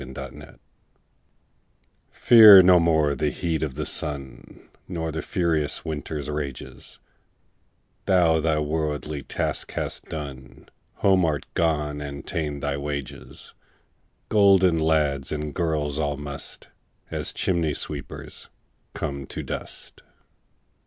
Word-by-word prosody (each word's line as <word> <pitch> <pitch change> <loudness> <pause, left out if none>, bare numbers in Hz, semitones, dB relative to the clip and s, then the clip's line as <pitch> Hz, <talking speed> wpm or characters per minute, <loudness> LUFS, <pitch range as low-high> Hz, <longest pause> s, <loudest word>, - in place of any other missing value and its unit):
Fidele 65 0 -10 1.5
FEAR 110 -5 +9
no 90 -1 +6
more 80 -3 +2
the 75 +1 0
heat 85 -1 -2
o' 80 - +1
the 65 - -5
sun, 70 -3 -4 0.2
Nor 80 -3 -3
the 80 - -4
furious 80 -6 -1
winter's 75 -2 -4
rages; 75 -3 -6 1.1
Thou 85 -4 +4
thy 80 -1 +1
worldly 75 -1 -2
task 65 - -3
hast - - -4
done, 70 -5 -8 0.4
Home 95 -2 +5
art 75 -3 0
gone, 75 -3 0
and 70 -1 -7
ta'en 75 -3 -3
thy 70 0 -2
wages: 70 -2 -6 0.7
Golden 95 -5 +4
lads 75 -4 +1
and 75 -1 -4
girls 75 -3 -1
all 75 -2 -1
must, 70 0 -8 0.4
As - - -3
chimney 85 -5 0
sweepers, 70 -3 -6 0.5
come 70 -1 -4
to - - -6
dust. - - -8
75 Hz, 110 wpm, -24 LUFS, 70-80 Hz, 1.5 s, FEAR